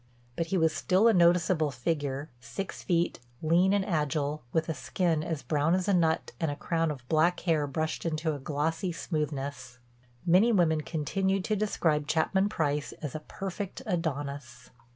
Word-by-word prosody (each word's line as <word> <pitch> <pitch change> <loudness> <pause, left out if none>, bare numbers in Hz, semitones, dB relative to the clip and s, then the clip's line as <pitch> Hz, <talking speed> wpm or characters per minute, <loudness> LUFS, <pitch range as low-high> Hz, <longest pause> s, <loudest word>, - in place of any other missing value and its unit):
But 165 - -1
he 190 - 0
was 160 -2 +3
still 185 +7 +3
a 230 - +6
noticeable 170 -3 +4
figure, 140 +2 -2
six 120 +11 -6
feet, 175 -1 0 0.2
lean 175 +4 +4
and 200 -1 +2
agile, 150 -3 -1
with 160 +1 0
a 160 - -1
skin 165 0 0
as 160 -3 -3
brown 155 +3 +2
as 185 0 -1
a 200 - +3
nut 165 -3 +2
and 160 - 0
a 145 - -2
crown 165 +2 0
of 130 -5 -6
black 160 +4 +2
hair 155 -4 +1
brushed 155 +3 -2 0.2
to 160 0 -1
a 145 - -5
glossy 155 +6 -1
smoothness. 140 -6 -4 0.5
Many 185 +7 +5
women 165 -7 +3
continued 190 +5 -1
to 215 - 0
describe 165 -8 0
Chapman 190 +6 +2
Price 150 -6 -1
as 150 -4 -6
"a 155 - -3
perfect 195 +7 -6
Adonis." 145 - -4
160 Hz, 170 wpm, -29 LUFS, 150-180 Hz, 0.5 s, a